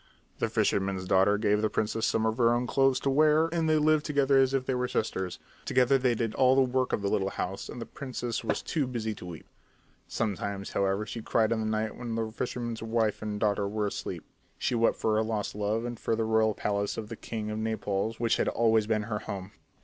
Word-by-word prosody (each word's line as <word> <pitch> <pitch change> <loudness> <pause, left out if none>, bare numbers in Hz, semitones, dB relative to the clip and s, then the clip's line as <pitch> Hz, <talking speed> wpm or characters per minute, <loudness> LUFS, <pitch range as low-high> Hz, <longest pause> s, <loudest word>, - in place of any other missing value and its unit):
The - - 0
fisherman's 95 -1 0
daughter 95 +2 +4
gave 105 -1 +2
the 110 - +1
princess 110 +2 0
some 110 0 +1
of 110 +2 -1
her 115 -1 +5
own 120 +1 0
clothes 135 +1 +2
to 140 - 0
wear 155 +2 +4
and 165 -2 +1
they 155 - +4
lived 155 0 +3
together 140 -2 +3
as 135 -1 +4
if 135 -1 0
they 130 - 0
were 125 0 0
sisters. 95 -6 -2 0.3
Together 130 +1 +3
they 125 -2 +2
did 115 -1 -1
all 130 0 +4
the 135 - +5
work 130 0 0
of 100 - -1
the - - +1
little 100 -1 +1
house 95 0 -4
and - - -7
the 115 - -5
princess 125 -4 -4
was - - -1
too 150 -5 -1
busy 115 -3 -3
to 90 - -10
weep. 85 -3 -9 0.6
Sometimes, 100 -2 -3
however, 100 +2 0
she 115 +2 -6
cried 110 0 +1
in 115 - +1
the 110 - -1
night 110 0 -1
when 120 -2 -4
the 110 -1 -2
fisherman's 120 0 -4
wife 110 -1 0
and 105 -1 -3
daughter 105 -1 +1
were 105 +1 -1
asleep. 100 - -4 0.3
She - - -1
wept 115 -1 +3
for 110 - 0
her 110 - +2
lost 110 -2 -2
love 105 +3 -1
and 120 -1 -5
for 115 - 0
the 115 - 0
royal 110 -1 +2
palace 100 0 -1
of 110 -2 -5
the 115 - -5
king 110 -1 -5
of 105 - -3
Naples 110 0 -2
which 115 -1 +2
had - - 0
always 110 -2 +2
been 110 -1 +1
her 105 -1 -3
home. 95 -1 -6
110 Hz, 235 wpm, -29 LUFS, 105-125 Hz, 0.6 s, her